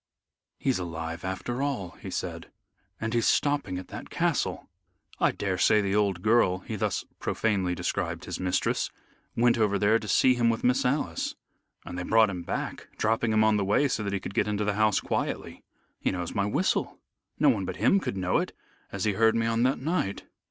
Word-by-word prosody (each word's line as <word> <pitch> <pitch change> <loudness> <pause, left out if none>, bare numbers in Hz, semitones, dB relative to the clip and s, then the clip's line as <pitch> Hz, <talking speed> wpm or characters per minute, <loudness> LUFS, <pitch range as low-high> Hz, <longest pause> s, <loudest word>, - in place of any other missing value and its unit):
"He's 130 -7 0
alive 85 -1 -5
after 95 +7 -3
all," 125 -11 -2
he - - -6
said, - - -5 0.5
"and 110 +1 -2
he's 115 -1 +2
stopping 145 -11 +1
at 90 - -8
that - - -8
castle. - - -1 0.5
I - - +4
daresay 100 +2 +2
the 100 -1 0
old 100 -3 +1
girl" 105 -5 +3
he 110 - -5
thus 100 - -1
profanely 95 -5 0
described - - -2
his - - -5
mistress 90 -1 0 0.5
"went 120 0 +3
over 105 -2 +2
to - - 0
there 110 +3 +4
to 110 - -8
see 130 +4 +5
him 120 -2 +2
with 115 - -1
Miss 125 +1 +2
Alice. 125 - -1 0.5
And 90 0 -6
they - - -3
brought 110 +1 +4
him 90 -2 -5
back, - - -4
dropping 110 +1 +1
him 110 0 +4
on 110 -1 +4
the 100 - +1
way 105 +9 +3
so 125 - -1
that 100 -1 -2
he 100 - 0
could 95 - -7
get 105 - +1
into 105 0 -1
the 105 - +1
house 110 0 +3
quietly. - - -3 0.4
He - - 0
knows 90 -2 -3
my 100 0 0
whistle. 180 - 0 0.4
No - - +5
one - - +1
but - - -4
him 195 - +4
could 100 - -4
know 90 -1 +1
it, - - -3 0.4
as 100 -2 -3
he 105 - +2
heard 110 +2 +3
me 115 0 +1
on 115 0 +1
that 130 +2 +2
night. 145 - -2
105 Hz, 205 wpm, -27 LUFS, 95-115 Hz, 0.5 s, see